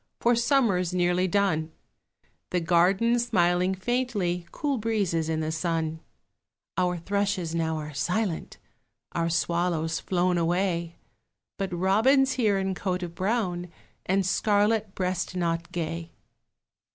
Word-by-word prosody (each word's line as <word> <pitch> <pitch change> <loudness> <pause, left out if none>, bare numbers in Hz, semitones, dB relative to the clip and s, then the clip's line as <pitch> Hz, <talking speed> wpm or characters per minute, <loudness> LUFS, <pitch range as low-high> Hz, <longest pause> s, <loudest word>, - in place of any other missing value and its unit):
For 240 0 +3
Summer's 230 - +2
nearly 180 +1 +2
done; 170 -5 +1 0.8
The 180 - +1
garden 185 +8 +3
smiling 185 -5 +2
faintly, 190 -6 -1
Cool 285 -4 -1
breezes 200 -8 0
in 160 0 0
the 155 0 -2
sun; 160 -1 -1 0.8
Our 180 -1 +1
thrushes 195 -1 -1
now 160 -1 0
are 150 -1 -6
silent, 180 +5 -2 0.5
Our 170 0 0
swallows 165 -1 0
flown 180 -1 +1
away, 170 0 0 0.6
But 195 -1 -2
Robin's 220 +10 +3
here 215 -6 +2
in 190 0 -1
coat 185 -1 -2
of 170 -1 -5
brown, 185 -2 -1 0.4
And 190 +1 +2
scarlet 210 +2 +1
breast 185 0 -2
knot 170 -1 -1
gay. 165 0 -4
180 Hz, 120 wpm, -27 LUFS, 170-205 Hz, 0.8 s, For